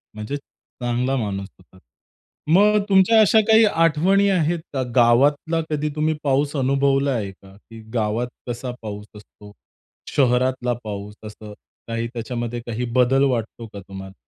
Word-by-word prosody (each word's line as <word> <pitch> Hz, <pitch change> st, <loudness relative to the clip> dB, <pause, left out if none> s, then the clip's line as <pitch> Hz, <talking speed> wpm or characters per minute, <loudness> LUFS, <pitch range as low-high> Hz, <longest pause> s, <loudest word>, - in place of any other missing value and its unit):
म्हणजे 110 Hz, +6 st, -5 dB
चांगला 125 Hz, -1 st, -4 dB
माणूस 100 Hz, -4 st, -3 dB
होता. 95 Hz, 0 st, -22 dB, 0.8 s
मग 210 Hz, +3 st, +5 dB
तुमच्या 195 Hz, +3 st, +5 dB
अशा 220 Hz, +1 st, +5 dB
काही 220 Hz, 0 st, +6 dB
आठवणी 175 Hz, +3 st, +2 dB
आहेत 170 Hz, -3 st, +1 dB
का? 135 Hz, -2 st, -1 dB
गावातला 140 Hz, +7 st, +3 dB
कधी 150 Hz, 0 st, -1 dB
तुम्ही 155 Hz, +1 st, +1 dB
पाऊस 140 Hz, +1 st, 0 dB
अनुभवलाय 135 Hz, -4 st, +1 dB
का? 95 Hz, 0 st, -18 dB
की 115 Hz, +2 st, -14 dB
गावात 115 Hz, +1 st, -1 dB, 0.2 s
कसा 125 Hz, +1 st, -4 dB
पाऊस 105 Hz, -2 st, -7 dB
असतो? 105 Hz, 0 st, -15 dB, 0.6 s
शहरातला 125 Hz, -1 st, +1 dB
पाऊस, 105 Hz, -1 st, -7 dB
असं 105 Hz, 0 st, -10 dB, 0.3 s
काही 115 Hz, 0 st, -3 dB
त्याच्यामध्ये 120 Hz, 0 st, -4 dB
काही 120 Hz, +1 st, -3 dB
बदल 130 Hz, +2 st, +4 dB
वाटतो 115 Hz, -1 st, -4 dB
का 100 Hz, -, -7 dB
तुम्हाला? 95 Hz, 0 st, -10 dB
125 Hz, 135 wpm, -21 LUFS, 110-150 Hz, 0.8 s, काही